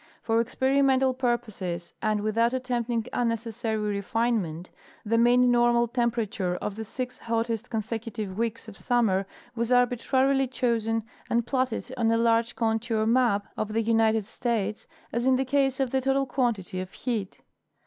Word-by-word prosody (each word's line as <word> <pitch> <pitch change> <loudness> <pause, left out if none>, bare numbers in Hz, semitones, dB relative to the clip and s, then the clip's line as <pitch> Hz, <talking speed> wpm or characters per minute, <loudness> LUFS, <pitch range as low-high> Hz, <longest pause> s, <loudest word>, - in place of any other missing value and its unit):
For 225 0 +2
experimental 265 +2 +2
purposes, 215 -9 -2
and 215 -2 +1
without 230 +3 +1
attempting 240 -2 -1
tinnecessary 230 -1 -2
refinement, 205 -4 -1 0.3
the 230 +2 +2
mean 245 +1 +5
normal 240 0 +3
temperature 225 -6 -1
of 200 +2 -4
the 220 - -5
six 250 +3 -5
hottest 230 0 -2
consecutive 220 -3 -4
weeks 230 +1 -2
of 215 -2 -11
summer 210 -6 +1 0.3
was 235 0 -2
arbitrarily 260 +2 +3
chosen 230 -3 0 0.3
and 235 0 +1
platted 255 -1 -1
on 230 -2 +2
a 230 - +3
large 230 0 +2
contour 225 0 0
map 230 -3 +2
of 215 0 -3
the 225 - +2
United 225 -1 +2
States, 220 -2 -2 0.3
as 240 +2 0
in 260 - +5
the 265 +1 0
case 270 0 +1
of 265 -3 0
the 265 - +1
total 270 +1 +1
quantity 225 -9 -1
of 185 0 -6
heat. 225 -6 -4
230 Hz, 150 wpm, -27 LUFS, 220-245 Hz, 0.3 s, mean